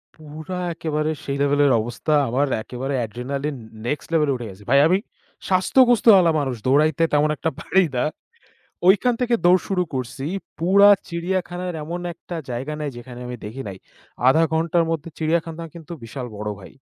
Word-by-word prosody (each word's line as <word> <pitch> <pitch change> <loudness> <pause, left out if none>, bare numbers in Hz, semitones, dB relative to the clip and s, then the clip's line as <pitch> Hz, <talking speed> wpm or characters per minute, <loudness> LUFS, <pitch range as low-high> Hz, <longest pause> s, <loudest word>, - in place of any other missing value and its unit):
পুরা 155 +3 -7
একেবারে 155 -1 -2
সেই 140 0 -3
লেভেলের 145 -1 +3
অবস্থা 120 +7 -2 0.2
আমার, 135 +5 +1 0.2
একেবারে 130 +4 -4
অ্যাড্রিনালিন 135 +6 -3 0.3
নেক্সট 145 +4 -3
লেভেল 155 -3 +3
এ 135 - 0
উঠে 120 -4 -6
গেছে। 95 +2 -13
ভাই 140 +2 +6
আমি 180 +3 +3 0.5
স্বাস্থ্যগোস্ত 240 +6 +4
ওয়ালা 180 -5 +6
মানুষ 135 -3 -2
দৌড়াইতে 155 +4 +3
তেমন 150 +1 +3
একটা 160 - -1
পাড়ি 190 +1 +2
না। 125 - +1 0.8
ওইখান 210 +6 +5
থেকে 245 -1 +2
দৌড় 180 +1 +6
শুরু 185 -2 +1
করছি, 130 +1 -4 0.3
পুরা 195 +4 +6 0.2
চিড়িয়াখানার 180 +1 -3
এমন 170 +3 -4
একটা 175 +1 -9
জায়গা 130 +5 -4
নেই 145 -2 -3
যেখানে 120 0 -10
আমি 125 - -5
দেখি 115 +6 -6
নাই। 95 -1 -7 0.5
০.৫ 160 +5 +5
ঘন্টার 165 +1 +2
মধ্যে, 165 0 -3
চিড়িয়াখানা 165 +1 -1
কিন্তু 170 0 -11
বিশাল 125 +3 -6
বড় 105 +1 -4
ভাই। 95 - -12
150 Hz, 165 wpm, -22 LUFS, 130-175 Hz, 0.8 s, ভাই